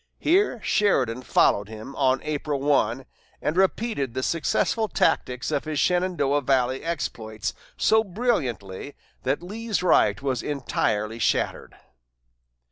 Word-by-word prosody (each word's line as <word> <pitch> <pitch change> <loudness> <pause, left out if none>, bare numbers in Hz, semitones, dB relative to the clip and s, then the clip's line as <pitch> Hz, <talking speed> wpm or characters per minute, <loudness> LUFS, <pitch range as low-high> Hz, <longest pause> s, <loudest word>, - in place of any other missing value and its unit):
Here 355 - +2
Sheridan 130 - +2
followed 105 -3 +2
him 110 +5 -9
on 130 -1 +2
April 150 -1 -2
1, 135 -3 +1 0.3
and 150 - -1
repeated 190 - 0
the 130 - -1
successful 195 - +1
tactics 125 -8 0
of 145 0 -1
his 155 -1 -3
Shenandoah 170 -4 +1
valley 130 -1 +1
exploits 110 -10 -3 0.2
so 220 0 +4
brilliantly 145 - -2 0.3
that 135 +6 -1
Lee's 215 +1 -3
right 180 - +4
was 130 -3 -1
entirely 115 -6 -1
shattered. - - -1
140 Hz, 120 wpm, -25 LUFS, 125-180 Hz, 0.3 s, so